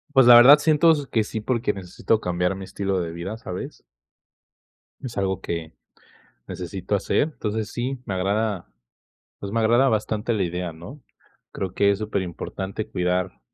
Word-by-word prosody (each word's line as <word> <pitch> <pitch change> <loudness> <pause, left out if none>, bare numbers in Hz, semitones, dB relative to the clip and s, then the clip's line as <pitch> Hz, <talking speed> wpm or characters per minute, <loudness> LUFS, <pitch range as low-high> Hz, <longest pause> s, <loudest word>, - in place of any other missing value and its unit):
Pues, 135 -2 +7
la 120 0 +9
verdad, 130 +5 +10
siento 160 +2 +4
s 145 -3 0
que 110 -2 +2
sí, 110 0 -5
porque 115 -2 0
necesito 95 +3 -1
cambiar 90 +1 -1
mi 95 - -7
estilo 95 0 -2
de 85 -1 -4
vida, 85 +6 -6
¿sabes? 90 -5 -7 1.2
Es 120 -5 -7
algo 95 -1 -1
que 85 -1 -5 0.7
necesito 90 +3 -4
hacer. 100 - +1
Entonces, 110 0 -3
sí, 125 +2 -3
me 100 - -2
agrada, 100 - -1 0.7
pues, 100 0 -6
me 115 - +1
agrada 120 +4 +4
bastante 110 0 -1
la 105 -4 0
idea, 90 -1 -3
¿no? 95 - -11 0.5
Creo 95 -1 -4
que 100 0 +3
es 100 - -3
superimportante 95 0 -4
cuidar 90 0 -1
100 Hz, 160 wpm, -23 LUFS, 90-115 Hz, 1.2 s, verdad